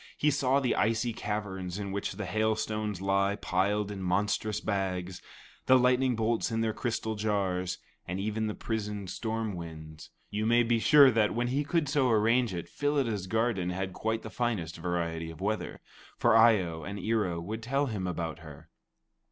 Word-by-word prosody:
He 150 - +3
saw 135 -1 +2
the 130 -4 +1
icy 115 +1 +1
caverns 100 -4 -4
in 100 -1 -4
which 100 0 -3
the 105 +1 -5
hail 110 +4 +1
stones 105 -3 -3
lie 100 +1 +2
piled 100 +2 0
in 100 -2 -6
monstrous 100 +3 0
bags, 95 -3 -2 0.5
the 130 - +7
lightning 125 0 +3
bolts 115 +1 0
in 115 -1 -1
their 110 -1 0
crystal 110 -2 -2
jars, 95 -4 -1 0.3
and 90 +2 -3
even 110 +2 -1
the 105 - -3
prisoned 105 -4 -4
storm 110 -2 -3
winds. 80 -3 -9 0.2
You 105 +1 -1
may 120 +1 +5
be 115 0 +2
sure 140 +1 +7
that, 110 -2 +2
when 120 +1 0
he 140 +3 0
could 155 +1 0
so 135 -3 +2
arrange 115 +1 +3
it, 85 -2 -5
Phyllida's 130 -10 -1
garden 110 -4 0
had 95 +1 -3
quite 110 +3 -2
the 110 - -7
finest 105 -10 -2
variety 85 -1 -2
of 80 - -10
weather. 105 +3 -3 0.4
For 120 -2 +4
Eye 115 -2 +7
o 80 -2 -5
and 100 +6 -6
Ear 110 +2 +1
o 85 -2 -3
would 105 +7 -5
tell 135 +5 0
him 105 -8 -3
about 85 -2 -3
her. 80 -4 -13
105 Hz, 185 wpm, -29 LUFS, 95-115 Hz, 0.5 s, the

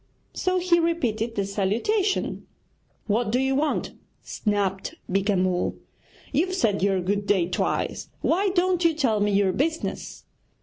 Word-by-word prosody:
So 370 -1 0
he 350 -1 +3
repeated 240 -10 0
the 200 - 0
salutation. 230 - 0 0.6
'What 215 +1 0
do 245 - +2
you 265 0 +1
want?' 295 +2 0 0.3
snapped 200 -2 -2
Beeka 195 +2 +1
Mull; 180 -1 0 0.6
'you've 370 +5 +1
said 215 - +1
your 195 -1 +2
"good 200 +2 -1
day" 185 -4 +3
twice, 180 - -2
why 390 +4 +2
don't 365 -1 +1
you 330 -2 +3
tell 245 -9 +1
me 205 0 +2
your 195 -1 +3
business?' 320 +4 -2
225 Hz, 140 wpm, -25 LUFS, 200-335 Hz, 0.6 s, he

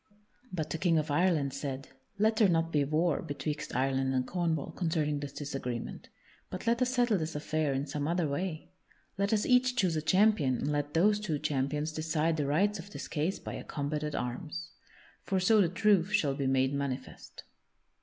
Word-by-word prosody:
But 160 -5 -3
the 160 - -2
King 170 -2 +3
of 155 -1 -1
Ireland 150 -4 +2
said: 135 -1 -5 0.3
"Let 215 +2 +2
there 215 -4 +5
not 165 -1 +1
be 150 -2 +2
war 155 +3 +1
betwixt 150 0 -4
Ireland 135 0 +1
and 130 -1 +1
Cornwall 165 -4 -1
concerning 155 -4 -1
this 145 -1 -5
disagreement, 135 -5 -5 0.4
but 185 - -6
let 235 +1 +2
us 255 0 +2
settle 240 -5 +2
this 160 0 -4
affair 155 0 0
in 135 +1 -1
some 145 0 -3
other 170 -1 +1
way. 155 +3 -3 0.5
Let 200 0 +1
us 210 -1 +2
each 250 0 +4
choose 185 -8 +2
a 155 - 0
champion 185 -6 +3
and 145 - -2
let 145 +1 -2
those 205 +5 +4
two 180 -8 -2
champions 150 +1 -1
decide 160 +1 0
the 145 -2 0
rights 195 +8 +2
of 175 +4 -9
this - - -7
case 160 +4 -1
by - - -7
a - - -6
combat 150 0 -3
at 150 -1 -3
arms. 160 +7 -4 0.5
For 190 - 0
so 215 +3 +5
the 175 - +3
truth 200 -1 +3
shall 145 -8 +2
be 135 -1 -2
made 130 +1 +2
manifest." 140 -2 -5
155 Hz, 195 wpm, -31 LUFS, 145-185 Hz, 0.5 s, there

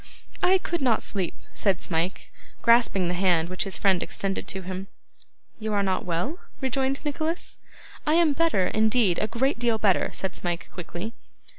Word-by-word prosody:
'I 375 +1 +5
could 345 -3 -1
not 245 -4 +2
sleep,' 190 -4 -3 0.2
said 195 -3 +1
Smike, 170 +2 -2 0.3
grasping 230 -6 +4
the 175 - 0
hand 175 -2 +2
which 185 0 -2
his 195 - -4
friend 190 -3 +3
extended 195 -1 -2
to 190 -1 -5
him. 185 +1 -5 0.7
'You 215 -1 -2
are 200 -1 +2
not 190 -1 0
well?' 210 - -1 0.2
rejoined 270 +2 0
Nicholas. 315 +4 -3 0.5
'I 305 - +4
am 330 -3 +5
better, 305 - +2
indeed. 215 -4 +3
A 215 - +1
great 250 +4 0
deal 235 -2 +2
better,' 200 -4 +2
said 190 - -4
Smike 175 -1 -3
quickly. 175 +5 -6
205 Hz, 165 wpm, -26 LUFS, 185-265 Hz, 0.7 s, I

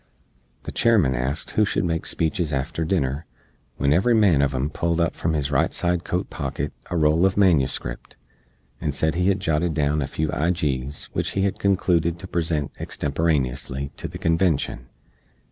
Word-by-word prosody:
The - - -6
Chairman 105 - +3
asked 65 +5 -2
who 110 - +3
shood 105 - 0
make 80 -2 -1
speeches 80 0 -1
after 75 +4 -2
dinner, 75 -3 -1 0.5
wen 70 +2 +2
every 105 +8 +3
man 100 -9 +4
uv 70 -1 +1
em 70 +4 -1
pulled 85 0 0
from 80 - -1
his 75 -1 -1
right 70 - +2
side 90 -1 0
coat 90 - -2
pocket 70 +2 -3 0.2
a 90 - -1
roll 75 0 +3
uv 95 +1 +3
manuscript, 75 -10 +1 0.7
and 75 -4 -1
sed 80 +2 +1
he 90 +2 +1
hed 100 -1 +2
jotted 80 -2 0
down 75 0 +1
a 70 - -1
few 80 +3 -2
ijees 75 -5 -1
wich - - -1
he 95 - +1
hed 100 - -1
conclooded 85 -4 +2
to 90 - -9
present 80 -5 -1
extemporaneously 70 -3 -1
to - - -5
the - - -8
Convenshun. 80 -7 0
80 Hz, 170 wpm, -23 LUFS, 70-90 Hz, 0.7 s, man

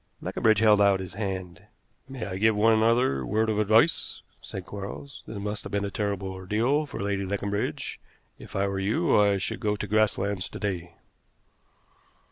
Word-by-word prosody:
Leconbridge 110 -1 +2
held 105 -1 +5
out 100 -1 +4
his 95 -2 -7
hand. 95 -4 -4 0.5
"May 130 -3 -5
I 95 -1 -5
give 110 +1 +4
one 110 +1 +4
other 115 - +3
word 110 +5 +1
of 105 - 0
advice?" 110 +10 +2 0.2
said 95 -2 -7
Quarles. 100 +8 -8
"This 110 - -6
must 105 +1 -3
have - - -8
been 100 -1 0
a 100 - -4
terrible 100 -2 -2
ordeal 110 +11 0
to - - -7
Lady 100 0 -1
Leconbridge. 100 +1 -3 0.4
If - - -11
I 100 0 +1
were 100 0 -2
you 95 +3 +1
I 100 -1 +3
should 95 - -3
go 105 -1 0
to 105 - -4
Grasslands 100 -2 +1
to - - -8
day." 90 -4 -3
100 Hz, 175 wpm, -27 LUFS, 95-110 Hz, 0.5 s, held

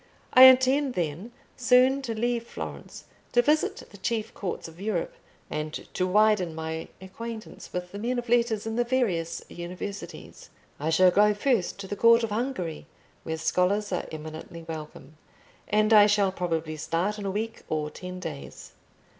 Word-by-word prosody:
"I 255 +1 +10
intend, 260 +1 +5
then, 175 +6 -3 0.2
soon 255 +2 +4
to 235 -4 -4
leave 235 0 -1
Florence, - - -8 0.3
to 245 - +5
visit 305 +3 +1
the 200 - -13
chief 220 +2 -2
courts 185 -4 -5
of 165 +3 -13
Europe, 200 -5 -2 0.3
and 150 0 -4 0.2
to 185 - 0
widen 205 -4 +3
my 160 0 -4
acquaintance 220 +4 -8
with 180 0 -5
the 200 - -7
men 245 +3 -1
of 240 0 -4
letters 235 -3 +2
in 225 +1 -3
the 240 - +3
various 210 -10 -1
universities. 180 +3 -8 0.3
I 150 +3 -1
shall 180 +3 +5
go 210 +2 +4
first 215 -6 0
to 195 - -7
the 205 - -4
court 230 +2 +5
of 225 - -2
Hungary, 210 - -3 0.3
where 160 0 -4
scholars 190 +5 +1
are 180 - -2
eminently 160 +1 -8
welcome; 155 -2 -9 0.5
and 215 +1 +3
I 210 -1 +8
shall 205 -2 +3
probably 165 -4 -3
start 175 +7 -1
in 205 - -5
a - - 0
week 220 +3 -3
or 150 -1 -2
ten 180 0 -8
days. 70 - -8
200 Hz, 165 wpm, -27 LUFS, 170-230 Hz, 0.5 s, I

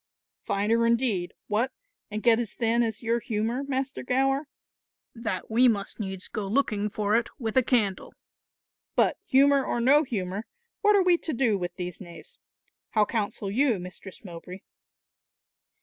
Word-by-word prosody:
"Finer 225 +4 +1
indeed 230 -7 +1
what, 225 +5 0 0.4
and 215 0 -4
get 235 -1 +5
as 230 -4 -3
thin 235 0 +1
as 225 0 -2
your 230 +1 +1
humour, 230 +4 -2
Master 270 -1 -3
Gower, 270 +3 +1 0.7
that 225 -4 -4
we 245 +3 +5
must 205 -3 -1
needs 190 -3 -4
go 210 -2 -4
looking 210 -3 0
for 210 +1 0
it 235 0 +1
with 225 -4 -4
a 260 - +6
candle. 220 -6 0 0.8
But - - +2
humour 275 +1 +5
or 240 - -1
no 270 +5 +5
humour, 205 -5 -4 0.3
what 420 -1 +5
are 395 - +5
we 355 -2 +4
to 315 - -3
do 235 -4 +2
with 175 -2 -4
these 180 +1 -6
knaves? 190 - -12 0.5
How 215 -1 +4
counsel 205 -2 -3
you, 245 0 +2
Mistress 180 +3 -10
Mowbray?" 180 +1 -9
225 Hz, 155 wpm, -27 LUFS, 200-260 Hz, 0.8 s, a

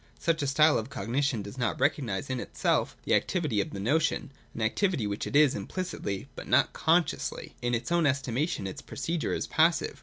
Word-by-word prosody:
Such 165 -2 0
a 140 - 0
style 150 +3 +4
of 110 +3 -6
Cognition 120 +1 -1
does 100 +6 -9
not 120 - -1
recognise 130 -5 0
in 130 - -1
itself - - 0
the - - 0
activity 150 - +1
of - - -4
the 100 - -7
notion 145 +6 0
— - - -32
an 115 - -2
activity 155 - +1
which 100 0 -3
it - - -5
is 145 -2 +6
implicitly, 155 - -4
but - - -8
not - - +3
consciously. 165 +2 0
In 120 0 +1
its 120 +7 -4
own 170 -3 +3
estimation 135 - -1
its 95 - -6
procedure 165 +4 -2
is - - -2
passive. 165 +2 +2
140 Hz, 195 wpm, -28 LUFS, 115-160 Hz, -, is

